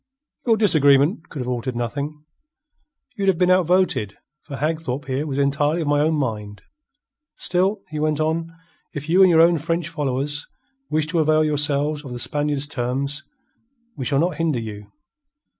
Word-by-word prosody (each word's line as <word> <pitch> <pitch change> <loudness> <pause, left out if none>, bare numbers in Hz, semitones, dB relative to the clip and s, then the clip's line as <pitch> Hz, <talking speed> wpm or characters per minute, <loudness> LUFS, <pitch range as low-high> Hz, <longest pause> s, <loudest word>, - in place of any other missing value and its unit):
"Your 225 -2 +4
disagreement 155 -4 +3
could 145 - -6
have 125 - -5
altered 125 0 -3
nothing. 145 +6 -4 0.9
You'd 200 -3 -2
have 190 -3 +3
been 180 +1 +3
outvoted, 180 - +2 0.3
for 140 - -8
Hagthorpe 145 -2 -2
here 135 +3 -2
was 135 -2 -3
entirely 145 +4 +1
of 155 - -3
my 145 0 +2
own 155 +1 +2
mind. 105 -7 -4 0.7
Still," 190 +3 0
he 155 -1 -5
went 155 -1 0
on, 160 +1 -1 0.4
"if 145 +1 -5
you 180 +4 +4
and 190 - +7
your 165 -2 +6
own 170 -1 +4
French 165 +1 -2
followers 145 -2 -2 0.4
wish 155 0 +1
to 165 +2 -1
avail 155 0 +3
yourselves 150 0 +1
of 130 -4 -8
the - - -5
Spaniard's 145 +2 0
terms, 140 +2 -2 0.7
we 140 - -5
shall 140 - +1
not 165 +1 +1
hinder 160 -6 0
you. 105 -2 -8
150 Hz, 165 wpm, -22 LUFS, 135-165 Hz, 0.9 s, and